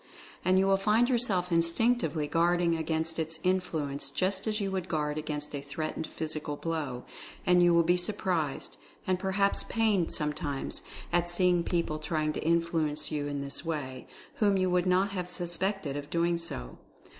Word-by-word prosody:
And 185 Hz, 0 st, +4 dB
you 190 Hz, -, +4 dB
will 195 Hz, 0 st, +4 dB
find 220 Hz, +5 st, +3 dB
yourself 195 Hz, -8 st, +1 dB
instinctively 170 Hz, -1 st, +2 dB
guarding 170 Hz, +1 st, +2 dB
against 160 Hz, 0 st, -2 dB
its 160 Hz, 0 st, -3 dB
influence, 155 Hz, -7 st, -1 dB
just 190 Hz, +7 st, -1 dB
as 215 Hz, 0 st, 0 dB
you 195 Hz, -2 st, -1 dB
would 185 Hz, -1 st, -2 dB
guard 150 Hz, -2 st, -1 dB
against 150 Hz, -1 st, -4 dB
a 140 Hz, -, -3 dB
threatened 155 Hz, +3 st, -4 dB
physical 155 Hz, -2 st, -4 dB
blow. 145 Hz, -6 st, -3 dB, 0.4 s
And 180 Hz, 0 st, +5 dB
you 175 Hz, 0 st, +6 dB
will 170 Hz, 0 st, +5 dB
be 175 Hz, +2 st, +3 dB
surprised, 175 Hz, -5 st, -1 dB, 0.3 s
and 185 Hz, -1 st, +1 dB
perhaps 195 Hz, +1 st, +1 dB
pained 215 Hz, -7 st, +1 dB
sometimes, 150 Hz, -2 st, -2 dB, 0.3 s
at 175 Hz, 0 st, +2 dB
seeing 175 Hz, -1 st, +3 dB
people 170 Hz, -3 st, -1 dB
try 155 Hz, 0 st, -1 dB
ing 155 Hz, 0 st, 0 dB
to -, -, -4 dB
influence 165 Hz, -2 st, 0 dB
you 145 Hz, -1 st, -1 dB
in 145 Hz, -1 st, -3 dB
this 140 Hz, +1 st, -4 dB
way, 140 Hz, -6 st, -4 dB, 0.3 s
whom 205 Hz, -2 st, +3 dB
you 185 Hz, -1 st, +1 dB
would 180 Hz, 0 st, +2 dB
not 185 Hz, +2 st, +3 dB
have 180 Hz, -2 st, -3 dB
suspected 175 Hz, -2 st, -1 dB
of 145 Hz, 0 st, -5 dB
doing 170 Hz, 0 st, +1 dB
so. 60 Hz, -, -6 dB
170 Hz, 170 wpm, -30 LUFS, 155-185 Hz, 0.4 s, you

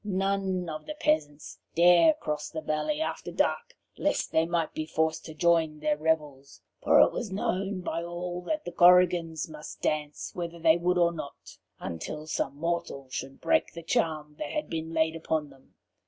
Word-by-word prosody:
None 195 Hz, -2 st, -1 dB
of 155 Hz, -, -6 dB
the 305 Hz, -, -5 dB
peasants 295 Hz, -, -1 dB, 0.2 s
dare 175 Hz, -, +6 dB
cross 150 Hz, -, -4 dB
the 160 Hz, -, -5 dB
valley 155 Hz, -, -1 dB
after -, -, -3 dB
dark, -, -, -1 dB, 0.2 s
lest -, -, 0 dB
they 160 Hz, +1 st, +2 dB
might 170 Hz, -2 st, -1 dB
be 155 Hz, 0 st, -4 dB
forced 160 Hz, 0 st, 0 dB
to 160 Hz, -, -9 dB
join 165 Hz, -1 st, +2 dB
their 150 Hz, 0 st, +1 dB
revels; 150 Hz, -3 st, -2 dB, 0.2 s
for -, -, +5 dB
it -, -, +5 dB
was 220 Hz, -5 st, -4 dB
known 190 Hz, 0 st, -1 dB
by 170 Hz, -, -3 dB
all 175 Hz, +1 st, -5 dB
that 310 Hz, -1 st, -2 dB
the 175 Hz, -, -4 dB
Korrigans 175 Hz, -2 st, +4 dB
must 155 Hz, -1 st, -10 dB
dance 150 Hz, -1 st, -2 dB
whether 170 Hz, -1 st, -5 dB
they 165 Hz, -1 st, +5 dB
would 180 Hz, +1 st, +1 dB
or 170 Hz, -1 st, +4 dB
not, 155 Hz, -4 st, -9 dB, 0.2 s
until 150 Hz, -, -5 dB
some 155 Hz, -, -2 dB
mortal 160 Hz, -4 st, -3 dB
should 135 Hz, +1 st, -5 dB
break 320 Hz, 0 st, +1 dB
the 170 Hz, -, -8 dB
charm 155 Hz, -2 st, -1 dB
that -, -, -3 dB
had 305 Hz, 0 st, -3 dB
been 160 Hz, 0 st, -3 dB
laid 160 Hz, 0 st, +1 dB
upon 155 Hz, -2 st, -2 dB
them. 135 Hz, -1 st, -21 dB
165 Hz, 180 wpm, -28 LUFS, 155-180 Hz, 0.2 s, dare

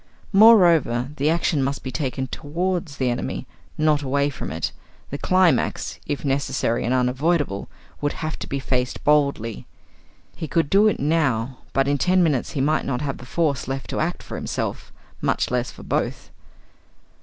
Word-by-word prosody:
Moreover, 170 Hz, -, +6 dB
the 145 Hz, +3 st, +2 dB
action 165 Hz, -2 st, +1 dB
must 135 Hz, +1 st, -2 dB
be 130 Hz, -, -4 dB
taken 130 Hz, 0 st, -2 dB
towards 170 Hz, +3 st, -3 dB
the 130 Hz, -2 st, +1 dB
enemy, 120 Hz, -, -3 dB, 0.3 s
not 155 Hz, -1 st, +3 dB
away 140 Hz, +1 st, +1 dB
from -, -, -6 dB
it; 80 Hz, 0 st, -2 dB, 0.4 s
the 140 Hz, -, -4 dB
climax, 185 Hz, -2 st, +2 dB
if 145 Hz, 0 st, -3 dB
necessary 135 Hz, -3 st, 0 dB
and 120 Hz, -, 0 dB
unavoidable, 130 Hz, -, 0 dB, 0.3 s
would 145 Hz, 0 st, 0 dB
have 155 Hz, -2 st, -4 dB
to -, -, -6 dB
be 140 Hz, -, -2 dB
faced 125 Hz, -1 st, -2 dB
boldly. 140 Hz, -7 st, +1 dB, 0.7 s
He 160 Hz, -, -5 dB
could 160 Hz, -1 st, 0 dB
do 205 Hz, +2 st, +6 dB
it 215 Hz, -, +1 dB
now; 135 Hz, -5 st, 0 dB
but 135 Hz, 0 st, +1 dB
in 145 Hz, 0 st, +1 dB
ten 185 Hz, +3 st, +3 dB
minutes 145 Hz, -7 st, 0 dB
he 140 Hz, -, -1 dB
might 155 Hz, +3 st, +2 dB
not 125 Hz, -1 st, -2 dB
have 140 Hz, -2 st, -3 dB
the 125 Hz, -, -11 dB
force 145 Hz, -4 st, 0 dB
left 135 Hz, 0 st, -4 dB
to -, -, -2 dB
act 170 Hz, +3 st, -2 dB
for -, -, -7 dB
himself, -, -, -4 dB, 0.3 s
much -, -, 0 dB
less 125 Hz, 0 st, 0 dB
for -, -, -12 dB
both! -, -, -2 dB
140 Hz, 170 wpm, -23 LUFS, 130-160 Hz, 0.7 s, Moreover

